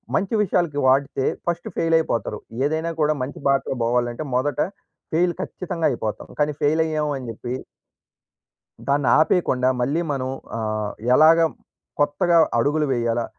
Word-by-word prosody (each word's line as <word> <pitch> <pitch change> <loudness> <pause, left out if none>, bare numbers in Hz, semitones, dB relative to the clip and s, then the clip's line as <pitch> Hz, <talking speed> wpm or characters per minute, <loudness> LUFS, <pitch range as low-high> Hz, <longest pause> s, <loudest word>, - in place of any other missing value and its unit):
మంచి 200 +3 0
విషయాలకి 170 -6 0
వాడితే 135 0 +2 0.2
ఫస్ట్ 170 0 -2
ఫెయిల్ 165 0 +2
అయిపోతారు. 115 -8 -2 0.3
ఏదైనా 160 +3 -1
కూడా 150 0 +3
మంచి 130 +3 -5
బాటలో 135 -1 +1
పోవాలంటే 120 +3 0
మొదట 145 +3 0 0.5
ఫెయిల్ 175 +2 +2
ఖచ్చితంగా 175 -3 -4
అయిపోతాం. 110 -4 -4
కానీ 150 0 +2
ఫెయిల్ 155 +2 +3
అయ్యాము 155 -2 -1
అని 130 -2 -8
చెప్పి 120 +3 -5 1.3
దాన్ని 140 -1 +1
ఆపేయకుండా. 130 -6 +2
మళ్ళీ 140 +7 0
మనం 130 -1 -2 0.3
ఆహ్, 110 -2 -2 0.2
ఎలాగ 160 +3 +7 0.6
కొత్తగా 170 +4 +2 0.2
అడుగులు 150 +3 +1
వేయాలా? 120 -1 0
145 Hz, 130 wpm, -22 LUFS, 125-160 Hz, 1.3 s, ఎలాగ